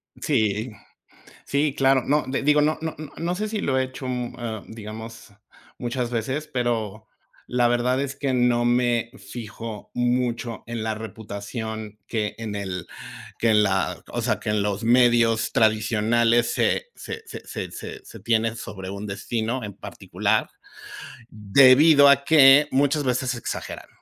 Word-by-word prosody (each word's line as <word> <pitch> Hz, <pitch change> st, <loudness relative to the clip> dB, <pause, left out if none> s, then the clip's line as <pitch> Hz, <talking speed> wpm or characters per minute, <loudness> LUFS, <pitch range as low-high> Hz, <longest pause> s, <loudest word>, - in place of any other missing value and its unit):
Sí, 110 Hz, +2 st, 0 dB, 0.7 s
sí, 140 Hz, 0 st, 0 dB
claro. 135 Hz, -1 st, +3 dB
No 150 Hz, +2 st, +2 dB
de, 130 Hz, -, -2 dB
digo, 150 Hz, +1 st, +4 dB
no 155 Hz, +1 st, +1 dB
no 160 Hz, -1 st, -4 dB, 0.2 s
no 170 Hz, +2 st, -2 dB
sé 215 Hz, +3 st, -3 dB
si 215 Hz, -1 st, -3 dB
lo 130 Hz, -1 st, 0 dB
he 130 Hz, -, +2 dB
hecho 130 Hz, +1 st, -8 dB
mu 125 Hz, -1 st, -3 dB
eh, 110 Hz, -4 st, -5 dB
digamos, 110 Hz, 0 st, -9 dB, 0.5 s
muchas 120 Hz, 0 st, -3 dB
veces, 130 Hz, +6 st, -3 dB
pero 110 Hz, -4 st, -2 dB, 0.4 s
la 120 Hz, -1 st, +2 dB
verdad 120 Hz, +2 st, +1 dB
es 140 Hz, 0 st, -3 dB
que 140 Hz, -2 st, -1 dB
no 120 Hz, -1 st, +2 dB
me 120 Hz, -1 st, +1 dB
fijo 110 Hz, -2 st, -8 dB
mucho 120 Hz, -2 st, -1 dB
en 115 Hz, -1 st, -4 dB
la 110 Hz, 0 st, -1 dB
reputación 110 Hz, 0 st, -7 dB
que 105 Hz, -2 st, -2 dB
en 110 Hz, -2 st, -5 dB
el 95 Hz, -3 st, -5 dB, 0.5 s
que 115 Hz, -, +2 dB
en 105 Hz, -1 st, +5 dB
la, 95 Hz, -2 st, 0 dB
o -, -, -3 dB
sea, -, -, 0 dB
que -, -, -3 dB
en 105 Hz, -1 st, +1 dB
los 105 Hz, +1 st, -2 dB
medios 120 Hz, -1 st, +3 dB
tradicionales 115 Hz, +2 st, +2 dB
se 485 Hz, -, 0 dB
se 450 Hz, -, -7 dB
se -, -, -7 dB
se 430 Hz, -2 st, -9 dB
se -, -, -12 dB
tiene 115 Hz, -1 st, +1 dB
sobre 95 Hz, -3 st, -7 dB
un 100 Hz, +2 st, -6 dB
destino 115 Hz, +5 st, -3 dB
en 100 Hz, -2 st, -7 dB
particular, -, -, -2 dB, 0.8 s
debido 135 Hz, +8 st, +6 dB
a 140 Hz, 0 st, +5 dB
que 145 Hz, -1 st, +7 dB
muchas 145 Hz, +2 st, +2 dB
veces 125 Hz, 0 st, 0 dB
se 125 Hz, -, -3 dB
exageran, -, -, -6 dB
120 Hz, 155 wpm, -24 LUFS, 110-130 Hz, 0.8 s, que